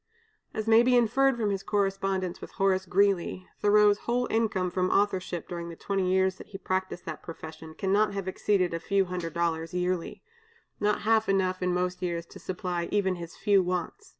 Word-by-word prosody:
As 215 - -3
may 225 +1 +7
be 250 +1 +4
inferred 265 +3 +3
from 215 -3 0
his 195 -1 -2
correspondence 195 -2 -1
with - - -9
Horace 190 -1 +1
Greeley, 185 -1 +1
Thoreau's 205 0 +5
whole 245 +1 0
income 205 -5 0
from 185 0 0
authorship 190 -4 0
during 170 -1 -5
the 170 - -8
twenty 190 0 -1
years 190 0 +2
that - - -10
he 195 - -8
practiced 185 -1 -3
that - - -6
profession, 160 -1 -9
cannot 200 +1 +1
have 195 -1 -4
exceeded 190 -2 +1
a 165 - -2
few 195 +3 +1
hundred 175 -3 -5
dollars 165 0 -1
yearly, 180 -1 -2 0.6
not 210 0 +1
half 220 0 +2
enough 185 -1 +1
in 180 0 +1
most 180 +1 -1
years 170 -2 -2
to - - -13
supply 180 -2 -3
even 190 -3 +1
his 170 -1 -8
few 200 -2 +4
wants. 180 - -3
190 Hz, 185 wpm, -28 LUFS, 180-205 Hz, 0.6 s, may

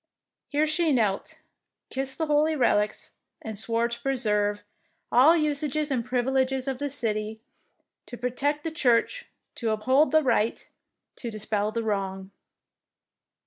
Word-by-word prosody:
Here 295 +1 +2
she 315 +1 +1
knelt, 215 -7 0 0.5
kissed 265 0 -3
the 320 - 0
holy 305 +1 +2
relics, 210 -6 +1 0.3
and 220 -1 -6
swore 230 +3 0
to 235 0 -7
preserve 210 -6 0 0.5
all 290 +8 +6
usages 300 -1 0
and 250 -3 0
privileges 260 +2 0
of 265 -2 -2
the 285 0 -2
city, 220 -5 -2 0.7
to 240 - -8
protect 275 +5 -1
the 325 - -3
church, 285 - +1 0.2
to 230 - -3
uphold 260 +8 +3
the 315 +2 +4
right, 230 -4 0 0.5
to 240 - -5
dispel 215 -1 -1
the 230 +1 -2
wrong." 195 -2 -3
250 Hz, 135 wpm, -26 LUFS, 215-290 Hz, 0.7 s, all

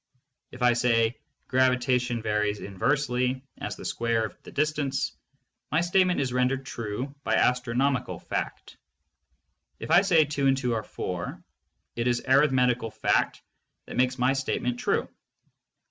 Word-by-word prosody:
If 125 0 -6
I 120 -1 +5
say, 115 -1 +2 0.3
"Gravitation 125 -2 +1
varies 105 -1 0
inversely 125 +4 0 0.2
as - - -4
the - - -10
square 115 -1 0
of 110 - -8
the - - -12
distance," 145 -2 -1 0.6
my 160 - +3
statement 180 +1 +2
is 130 -3 -1
rendered 130 +1 +1
true 120 +4 -5
by - - +1
astronomical 125 +2 +1
fact. - - -5 1.0
If - - -6
I 175 - +7
say, 170 -6 +4
"Two 145 -1 0
and 135 0 +3
two 125 -3 -1
are 110 - -1
four," 90 -4 -5 0.5
it 115 +1 -1
is 120 -1 +1
arithmetical 130 -4 +3
fact - - 0 0.4
that - - -8
makes 125 +1 +2
my 125 +2 +3
statement 125 -2 -2
true. - - 0
125 Hz, 140 wpm, -27 LUFS, 120-135 Hz, 1.0 s, I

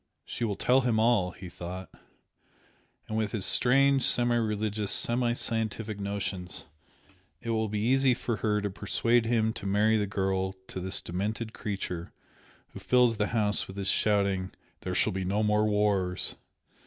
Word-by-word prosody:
"She - - -5
will 105 -3 -1
tell 130 +6 +3
him 120 -3 +1
all" 110 -5 +3
he 90 0 -10
thought 90 +2 -8 1.2
"And 110 - -4
with 110 -2 -1
his 105 -5 +1
strange 135 +2 +4
semi 120 -1 +3
religious, 105 -2 -1
semi 120 0 +2
scientific 110 -2 -1
notions, 100 -3 -4 0.7
it 115 - -4
will 110 -1 0
be 105 0 -2
easy 130 +2 +3
for 120 -2 -3
her 105 +1 0
to 100 -1 -3
persuade 115 +4 +1
him 110 -1 +1
to 100 - -6
marry 105 +3 +3
the 105 -1 -1
girl 95 -1 -1 0.2
to - - -6
this 95 +2 -2
demented 105 +5 -4
creature 95 -6 -5 0.6
who - - -10
fills 125 -3 +3
the 105 0 0
house 105 -3 +1
with 95 - -10
his 100 -1 -1
shouting 100 -3 +1 0.3
'There - - -4
shall - - +1
be 95 0 -3
no 100 +4 0
more 105 0 +2
wars!' 105 -3 0
105 Hz, 165 wpm, -28 LUFS, 95-115 Hz, 1.2 s, strange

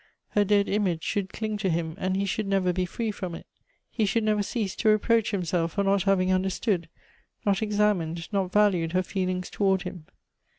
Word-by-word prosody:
Her 205 - +3
dead 205 0 +3
image 185 -6 0
should 200 -1 -2
cling 215 -1 -3
to 195 -2 -1
him, 165 -1 -1
and 190 0 0
he 200 - 0
should 200 +2 -2
never 190 -2 +1
be 180 0 -1
free 225 +4 -2
from 185 -4 -5
it. - - -10 0.5
He 215 -3 0
should 225 +3 +1
never 215 -1 +2
cease 205 -1 -2
to 220 - +2
reproach 220 +1 +3
him 190 -4 -1
self 165 0 0
for 200 - 0
not 195 0 +2
having 185 -1 +2
understood, 185 -2 0 0.6
not 200 0 +2
examined, 205 -6 0
not 190 -2 0
valued 185 -6 +2
her 185 0 +2
feelings 185 -1 -2
toward 190 -2 +1
him. 170 -4 -8
195 Hz, 200 wpm, -26 LUFS, 180-210 Hz, 0.6 s, Her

